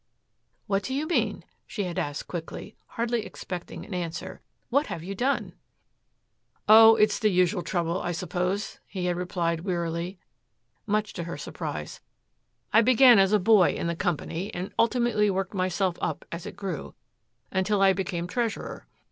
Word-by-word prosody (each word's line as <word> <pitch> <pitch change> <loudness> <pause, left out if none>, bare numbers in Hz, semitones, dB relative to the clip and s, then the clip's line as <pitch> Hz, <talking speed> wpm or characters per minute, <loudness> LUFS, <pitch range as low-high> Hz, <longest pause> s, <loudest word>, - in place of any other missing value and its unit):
"What 195 0 0
do 260 +6 -4
you 290 +3 -1
mean?" 340 - 0 0.2
she 205 - -3
had 180 -1 -3
asked 145 -1 -4
quickly, 175 +4 -7
hardly 235 -1 -1
expecting 180 -2 -7
an 210 - -8
answer. 170 -2 -5 0.3
"What 280 +4 +2
have 165 - -5
you 195 +3 -5
done?" 260 +8 -1 1.1
"Oh, 225 +1 +9
it 215 -1 +4
is - - -2
the 215 - +3
usual 180 0 +2
trouble, 170 0 -1
I 175 - -2
suppose," 180 +3 -2
he 185 -3 -4
had 175 -1 +1
replied 175 -2 -1
wearily, 170 0 -3 0.7
much 210 0 0
to 170 - -5
her 170 - -5
surprise. - - -6 0.7
"I 225 - +7
began 245 -1 +7
as 195 0 +4
a 210 - +5
boy 205 -1 +5
in - - -3
the 170 0 -1
company 175 +2 -2
and 180 +3 -5
ultimately 230 -3 +3
worked 190 -1 -2
myself 185 -1 0
up - - -3
as 170 0 -6
it - - -8
grew, 190 -7 -5 0.6
until 190 +2 +1
I 195 0 +6
became 180 -3 -3
treasurer. 225 +3 -3
190 Hz, 165 wpm, -27 LUFS, 175-215 Hz, 1.1 s, Oh